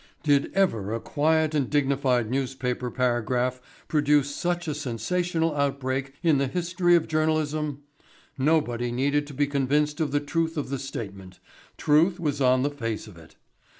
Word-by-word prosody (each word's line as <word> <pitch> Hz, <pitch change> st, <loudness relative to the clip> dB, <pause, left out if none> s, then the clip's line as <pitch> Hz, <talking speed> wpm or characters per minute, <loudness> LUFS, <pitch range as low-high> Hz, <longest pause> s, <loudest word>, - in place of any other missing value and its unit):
Did 145 Hz, -2 st, +2 dB
ever 115 Hz, -, +1 dB
a -, -, -3 dB
quiet 155 Hz, +4 st, +1 dB
and 140 Hz, -5 st, 0 dB
dignified 135 Hz, -4 st, +1 dB
newspaper 130 Hz, -2 st, -2 dB
paragraph 125 Hz, 0 st, 0 dB, 0.3 s
produce 145 Hz, -2 st, +2 dB
such 175 Hz, 0 st, -2 dB
a 155 Hz, -, -1 dB
sensational 160 Hz, +5 st, -1 dB
outbreak 135 Hz, -1 st, -1 dB
in 160 Hz, -5 st, +4 dB
the 140 Hz, -, +1 dB
history 175 Hz, +3 st, +2 dB
of 165 Hz, -2 st, +2 dB
journalism? 155 Hz, -2 st, 0 dB, 0.5 s
Nobody 130 Hz, -5 st, +1 dB
needed 140 Hz, +4 st, 0 dB
to 145 Hz, -, -10 dB
be 145 Hz, +2 st, +2 dB
convinced 145 Hz, +2 st, 0 dB
of 150 Hz, -3 st, 0 dB
the 145 Hz, -, +2 dB
truth 160 Hz, +3 st, -2 dB
of 145 Hz, -, -3 dB
the 135 Hz, -1 st, -3 dB
statement 100 Hz, -8 st, -7 dB, 0.4 s
truth 165 Hz, +5 st, +3 dB
was 145 Hz, -4 st, -1 dB
on 130 Hz, 0 st, +4 dB
the 145 Hz, -, 0 dB
face 115 Hz, -6 st, -4 dB
of 105 Hz, -5 st, -13 dB
it. 80 Hz, -1 st, -16 dB
145 Hz, 155 wpm, -26 LUFS, 130-155 Hz, 0.5 s, in